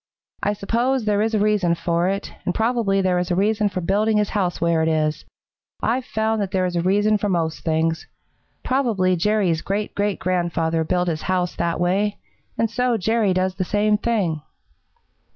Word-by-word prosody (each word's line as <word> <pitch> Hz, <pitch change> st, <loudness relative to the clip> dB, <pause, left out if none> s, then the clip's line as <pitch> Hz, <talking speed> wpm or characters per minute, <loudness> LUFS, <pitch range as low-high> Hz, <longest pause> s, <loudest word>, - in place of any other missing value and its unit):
I 205 Hz, -, +1 dB
suppose 235 Hz, +5 st, 0 dB
there 205 Hz, -1 st, +2 dB
is 220 Hz, +1 st, 0 dB
a -, -, +2 dB
reason 205 Hz, -5 st, +2 dB
for 170 Hz, +1 st, 0 dB
it, 195 Hz, +1 st, -3 dB
and 180 Hz, -, -2 dB
probably 225 Hz, -4 st, +1 dB
there 185 Hz, -1 st, +1 dB
is 180 Hz, -, -2 dB
a 175 Hz, -, +1 dB
reason 210 Hz, +2 st, +2 dB
for 185 Hz, -1 st, -4 dB
building 210 Hz, +5 st, +1 dB
his 210 Hz, -1 st, +1 dB
house 185 Hz, -4 st, -1 dB
where 170 Hz, -1 st, +2 dB
it 160 Hz, -, +1 dB
is. 155 Hz, -1 st, 0 dB, 0.6 s
I've 250 Hz, +2 st, 0 dB
found 220 Hz, -2 st, -1 dB
that 200 Hz, -, -2 dB
there 185 Hz, -1 st, 0 dB
is 180 Hz, -1 st, -2 dB
a 170 Hz, -, +1 dB
reason 205 Hz, +4 st, +2 dB
for 205 Hz, -, -1 dB
most 165 Hz, -3 st, -1 dB
things. 160 Hz, 0 st, 0 dB, 0.6 s
Probably 225 Hz, -9 st, +1 dB
Jerry's 185 Hz, -3 st, +1 dB
great 205 Hz, +2 st, -3 dB
great 205 Hz, -1 st, -1 dB
grandfather 170 Hz, -3 st, 0 dB
built 180 Hz, +2 st, 0 dB
his 155 Hz, -2 st, -2 dB
house 180 Hz, -1 st, -1 dB
that 170 Hz, -1 st, -1 dB
way, 195 Hz, +4 st, +1 dB, 0.4 s
and 230 Hz, -, +2 dB
so 245 Hz, +1 st, 0 dB
Jerry 220 Hz, 0 st, +1 dB
does 185 Hz, 0 st, 0 dB
the 190 Hz, 0 st, -2 dB
same 210 Hz, +2 st, +2 dB
thing." 205 Hz, -8 st, -1 dB
195 Hz, 190 wpm, -22 LUFS, 175-215 Hz, 0.6 s, there